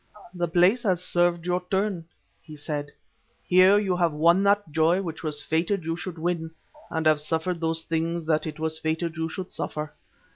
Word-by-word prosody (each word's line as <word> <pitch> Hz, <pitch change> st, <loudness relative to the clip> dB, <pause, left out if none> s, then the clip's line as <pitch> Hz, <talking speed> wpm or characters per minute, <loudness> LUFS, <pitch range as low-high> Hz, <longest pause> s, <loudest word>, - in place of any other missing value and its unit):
"The 175 Hz, -1 st, -1 dB
place 180 Hz, +8 st, +3 dB
has 185 Hz, -6 st, 0 dB
served 175 Hz, -1 st, +1 dB
your 180 Hz, 0 st, 0 dB
turn," 190 Hz, -3 st, -1 dB, 0.4 s
he 155 Hz, -, -12 dB
said; 145 Hz, -1 st, -4 dB, 0.5 s
"here 185 Hz, +2 st, +6 dB
you 195 Hz, -3 st, +1 dB
have 170 Hz, -3 st, +2 dB
won 170 Hz, +5 st, +4 dB
that 200 Hz, -4 st, +2 dB
joy 165 Hz, +4 st, +3 dB
which 165 Hz, -3 st, -5 dB
it -, -, -12 dB
was 150 Hz, -2 st, -2 dB
fated 170 Hz, +4 st, 0 dB
you 165 Hz, +1 st, -2 dB
should 175 Hz, 0 st, -7 dB
win, 165 Hz, 0 st, -2 dB, 0.4 s
and 160 Hz, -1 st, -2 dB
have 155 Hz, -1 st, +4 dB
suffered 160 Hz, +3 st, -1 dB
those 165 Hz, 0 st, 0 dB
things 165 Hz, +1 st, -2 dB
that 155 Hz, 0 st, +1 dB
it 155 Hz, 0 st, -7 dB
was 160 Hz, 0 st, -2 dB
fated 160 Hz, +1 st, -2 dB
you 160 Hz, 0 st, -2 dB
should 185 Hz, +2 st, -6 dB
suffer. 150 Hz, 0 st, -4 dB
165 Hz, 190 wpm, -25 LUFS, 160-180 Hz, 0.5 s, here